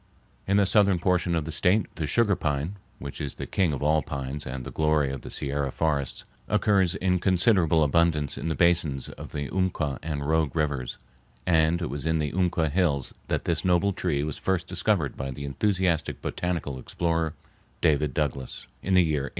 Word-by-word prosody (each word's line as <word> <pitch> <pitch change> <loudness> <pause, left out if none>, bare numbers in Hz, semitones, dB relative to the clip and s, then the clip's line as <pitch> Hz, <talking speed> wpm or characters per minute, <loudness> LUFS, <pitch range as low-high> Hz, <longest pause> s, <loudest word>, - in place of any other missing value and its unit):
In 100 +1 +3
the 100 - +5
southern 100 -1 +4
portion 90 0 +1
of 80 -3 -1
the 80 - -4
State 95 +7 +2
the 80 -2 -2
sugar 105 +5 +3
pine, 75 +3 -2 0.2
which 70 +2 -7
is 70 -3 -4
the - - -5
king 90 -5 +1
of 70 0 -3
all 75 +1 +3
the - - -15
pines 70 +1 -4
and 65 -1 -5
the - - -6
glory 75 -3 +2
of 70 - -5
the - - -8
Sierra 70 -1 -2
forests, 75 -4 -1 0.2
occurs 100 -4 +2
in 90 -1 +1
considerable 90 -3 +3
abundance 75 -1 +2
in - - -4
the 80 - 0
basins 85 -7 +2
of - - -9
the 70 -2 -3
Umpqua 90 -7 -1
and 75 -3 -3
Rogue 80 -2 +1
Rivers, 70 -6 -1 0.5
and 85 0 +3
it 80 - -3
was 70 +2 -3
in 80 0 +2
the 75 -2 -2
Umpqua 85 -3 +1
Hills 75 -5 0
that - - -1
this - - 0
noble 90 +2 +3
tree 75 -6 -1
was 75 -1 -4
first 95 -2 0
discovered 95 -6 0
by 70 - -4
the 70 +2 -6
enthusiastic 90 +2 0
botanical 80 -7 -3
explorer 80 +3 -1 0.4
David 75 -4 +2
Douglas, 70 -4 -2 0.2
in 95 +1 +1
the 90 - +7
year 75 -3 0
1826. - - -5
80 Hz, 195 wpm, -26 LUFS, 70-90 Hz, 0.5 s, the